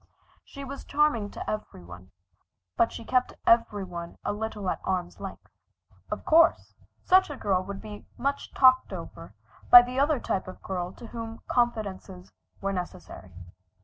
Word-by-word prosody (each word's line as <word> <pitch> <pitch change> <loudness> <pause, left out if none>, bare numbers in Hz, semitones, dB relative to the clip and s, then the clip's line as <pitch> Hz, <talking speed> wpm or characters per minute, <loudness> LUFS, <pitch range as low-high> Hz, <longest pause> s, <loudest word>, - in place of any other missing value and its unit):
She 280 - -10
was 275 +1 -7
charming 285 -8 +1
to - - -8
every 210 - -5
one, 90 +1 -12 0.7
but 230 - +2
she 230 - -8
kept 250 +1 +1
every 220 -3 +3
one 170 -2 -8
a - - 0
little 210 -2 -5
at - - -5
arm's 180 -2 -3
length. - - -8 0.6
Of - - -5
course 330 +1 +4 0.3
such 375 -1 +4
a 290 - -5
girl 190 -5 +1
would 200 0 -6
be 210 -1 -10
much 280 +1 -2
talked 255 -1 +5
over - - -9 0.3
by 245 0 +11
the 250 +2 -4
other 285 0 +2
type 185 - -2
of 185 - -10
girl 180 -2 -3
to - - -12
whom 230 0 -7
confidences 200 -6 -2 0.3
were 195 0 -1
necessary. 95 - -7
215 Hz, 160 wpm, -27 LUFS, 185-255 Hz, 0.7 s, by